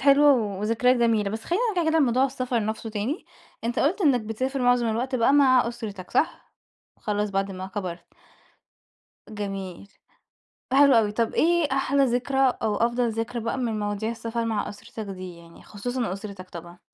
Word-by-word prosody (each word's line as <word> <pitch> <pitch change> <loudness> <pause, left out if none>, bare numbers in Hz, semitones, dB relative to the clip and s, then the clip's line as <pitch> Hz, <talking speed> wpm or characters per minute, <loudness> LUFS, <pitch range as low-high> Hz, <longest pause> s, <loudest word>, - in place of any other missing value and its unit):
حلوة 285 +1 +6
و 205 -6 -1
وذكريات 230 +4 +2
جميلة. 225 -4 +2
بس 220 +2 -5
خّلينا 360 +7 0
نرجع 330 -2 +2
كده 320 - +3
لموضوع 260 -3 +3
السفر 255 -4 -1
نَفْسه 220 +1 -4
تاني، 220 - -3 0.4
أنت 235 +1 -1
قُلت 335 +9 +1
إنّك 280 -9 +4
بتسافر 255 +5 -3
معظم 245 -1 +3
الوقت 245 +4 -1
بقى 245 +2 +3
مع 260 -4 +5
أسرتك 210 -6 -7
صح؟ 325 - -1 0.5
خلاص 210 -1 -1
بعد 195 0 -1
ما 185 0 -6
كبرت. 185 -3 -6 1.2
جميل. 195 -3 -6 0.8
حلو 280 0 +6
أوي. 210 -2 +1
طَب 230 +1 -1
إيه 340 -2 +3
أحلى 275 +1 +2
ذكرى 250 +2 0 0.2
أو 215 -2 +1
أفضل 240 +1 +1
ذكرى 230 +2 -3
بقى 230 +3 -2
من 230 -4 -1
مواضيع 205 +1 -2
السفر 230 0 -3
مع 225 -2 -1
أسرتك 225 +2 -8
دي 185 -2 -8
يعني، 170 0 -16
خصوصًا 240 +1 -3
أُسرِتك 195 -2 -8
طبعًا؟ 170 +1 -10
230 Hz, 165 wpm, -25 LUFS, 205-260 Hz, 1.2 s, حلوة